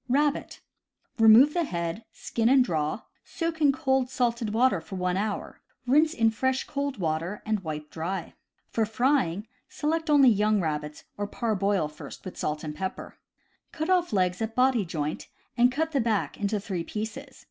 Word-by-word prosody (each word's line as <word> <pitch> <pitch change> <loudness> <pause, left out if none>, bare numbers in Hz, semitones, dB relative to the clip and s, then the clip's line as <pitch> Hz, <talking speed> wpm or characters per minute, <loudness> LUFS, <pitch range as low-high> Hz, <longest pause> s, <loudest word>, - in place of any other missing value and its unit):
Rabbit. 290 +3 0 0.3
— 250 - -38
Remove 225 +7 +7
the 345 - +1
head; 170 - -4
skin 230 0 -1
and 260 -1 +5
draw; 155 0 -1 0.2
soak 330 -2 -4
in 290 -2 +6
cold 265 -3 0
salted 235 -4 -1
water 225 -5 +2
for 160 +4 -9
one 180 -1 -1
hour; 205 +2 -3 0.2
rinse 300 +6 +3
in 225 -1 +3
fresh 260 +4 0
cold 280 -2 -3
water, 170 +3 -2
and 215 -1 0
wipe 155 -4 -6
dry. 170 +2 -4 0.4
For 225 - +1
frying, 220 - +1 0.2
select 320 +2 -2
only 280 -3 +7
young 210 -1 +3
rabbits, 150 -3 -3
or 205 0 -2
parboil 200 -6 0
first 150 +5 -11
with 185 - -7
salt 150 +1 -3
and 150 -1 -4
pepper. 185 +4 -6 0.5
Cut 315 +3 -2
off 360 -1 +2
legs 185 -1 +1
at 225 0 -3
body 250 -5 +3
joint, 155 -3 -4 0.3
and 245 +1 +4
cut 320 +4 -1
the 280 -4 +1
back 225 -3 0
into 205 +1 -1
three 190 -4 -4
pieces. 215 +4 -6
220 Hz, 170 wpm, -27 LUFS, 180-265 Hz, 0.5 s, Remove